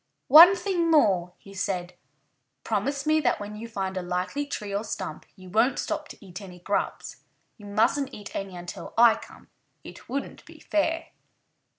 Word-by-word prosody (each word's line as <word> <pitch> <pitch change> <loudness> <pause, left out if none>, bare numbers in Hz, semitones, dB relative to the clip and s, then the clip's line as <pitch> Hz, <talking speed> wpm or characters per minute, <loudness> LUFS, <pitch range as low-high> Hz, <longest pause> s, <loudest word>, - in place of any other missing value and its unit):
"One 335 +7 +10
thing 360 -4 0
more!" 190 - +3
he 195 - -15
said. 180 -2 -3 0.7
"Promise 270 +7 -2
me 310 0 +3
that 305 - +1
when 205 +1 -7
you 225 +2 -7
find 195 -4 -4
a 185 - -2
likely 180 +11 -3
tree 210 -7 -5
or 200 +2 -1
stump 220 - -6
you 185 -2 -14
won't 225 +8 +2
stop - - -3
to - - -13
eat 180 +1 -9
any 180 -3 -11
grubs. 200 +3 -3 0.4
You 205 - -11
mustn't 240 +7 +1
eat 205 -4 -10
any 195 -2 -5
until 175 0 -8
I 235 -1 +7
come. - - -12 0.3
It - - -13
wouldn't 275 +3 -5
be - - -15
fair." 320 +1 -1
210 Hz, 175 wpm, -26 LUFS, 190-280 Hz, 0.7 s, One